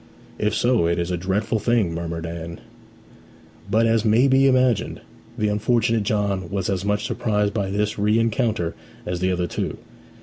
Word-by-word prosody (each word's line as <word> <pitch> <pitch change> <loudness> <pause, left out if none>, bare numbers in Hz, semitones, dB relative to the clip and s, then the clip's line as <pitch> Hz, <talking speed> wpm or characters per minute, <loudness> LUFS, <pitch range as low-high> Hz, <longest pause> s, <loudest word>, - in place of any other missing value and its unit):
'If 105 0 0
so, 120 -6 +2
it 85 - +1
is 85 +1 -2
a - - +1
dreadful 95 +5 -1
thing!' 110 -6 +1
murmured 85 0 -4
Anne. 85 0 -6 1.1
But, 110 +3 +3
as 115 -1 +2
may 115 +4 +4
be 135 0 +4
imagined, 130 -3 +2 0.4
the 105 -3 +1
unfortunate 115 +1 +1
John 100 -3 -1
was 100 -1 -2
as 95 -1 -2
much 105 0 0
surprised 105 -2 0
by 100 -3 -1
this 105 +1 -1
rencounter 110 -3 +1 0.3
as 90 0 -3
the 95 +1 +1
other 90 -1 0
two. 85 - -3
105 Hz, 165 wpm, -23 LUFS, 90-115 Hz, 1.1 s, may